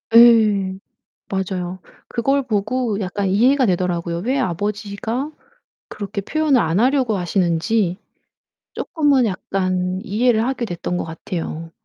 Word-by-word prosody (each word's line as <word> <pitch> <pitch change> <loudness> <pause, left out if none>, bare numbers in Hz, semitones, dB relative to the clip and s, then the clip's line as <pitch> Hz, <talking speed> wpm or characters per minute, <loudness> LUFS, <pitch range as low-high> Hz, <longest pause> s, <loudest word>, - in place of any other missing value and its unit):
예. 215 -5 +6 0.5
맞아요. 185 -1 -3 0.3
그걸 270 +4 +1
보고 220 0 -1
약간 195 0 -2
이해가 250 +8 +4
되더라고요. 175 -2 -1
왜 255 +9 0
아버지가 210 - -2 0.6
그렇게 200 0 -5
표현을 295 +4 +2
안 165 0 +1
하려고 255 -4 +2
하시는지 180 +2 0 0.8
쪼끔은 285 -5 +2
약간 185 -2 -1
이해를 225 +2 +2
하게 255 -2 -1
됐던 175 -2 -3
것 - - -2
같아요. 165 0 -5
205 Hz, 270 characters per minute, -20 LUFS, 185-240 Hz, 0.8 s, 예